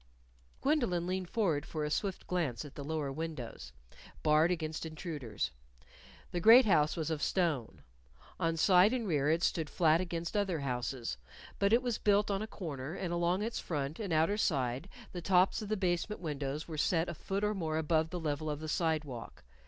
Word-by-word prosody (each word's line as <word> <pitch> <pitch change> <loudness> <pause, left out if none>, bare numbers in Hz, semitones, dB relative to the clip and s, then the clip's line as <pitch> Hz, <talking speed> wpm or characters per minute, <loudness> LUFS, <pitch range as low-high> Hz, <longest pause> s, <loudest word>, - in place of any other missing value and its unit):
Gwendolyn 240 - +1
leaned 185 0 -2
forward 170 -11 +1
for 155 -1 -3
a 150 - -3
swift 195 +3 -2
glance 155 -8 -1
at 145 - -10
the 140 - -7
lower 150 -1 -2
windows, 135 - -6 0.5
barred 155 +2 +4
against 160 -3 -2
intruders. 150 - -4 0.8
The 175 - -1
great 230 +8 +8
house 155 -7 +3
was 160 -1 -2
of 155 -2 -2
stone. 160 - 0 0.6
On 165 0 0
side 185 +5 +5
and 240 -4 -1
rear 150 -4 +2
it 165 +2 +2
stood 160 -3 0
flat 165 0 +3
against 170 -1 -4
other 190 -7 0
houses. 125 - -3 0.4
But 200 +1 +3
it 235 +3 +4
was 245 -3 -1
built 205 0 +3
on 195 0 0
a 215 - -3
corner; 155 -7 -6
and 180 -3 -3
along 175 +3 +1
its 230 +1 -2
front 145 -2 -3
and 205 -5 -3
outer 160 +6 +3
side, 135 - 0 0.2
the 175 - -5
tops 185 +4 +3
of 210 - -6
the 215 - 0
basement 185 +3 -1
windows 150 -2 -3
were 155 -3 -5
set 165 +2 +2
a 175 - -3
foot 195 +5 -3
or 210 0 +2
more 160 -5 -2
above 160 0 +1
the 180 - -4
level 155 -1 -2
of 150 -1 -3
the 155 - -6
sidewalk. 155 - -2
165 Hz, 190 wpm, -33 LUFS, 150-185 Hz, 0.8 s, great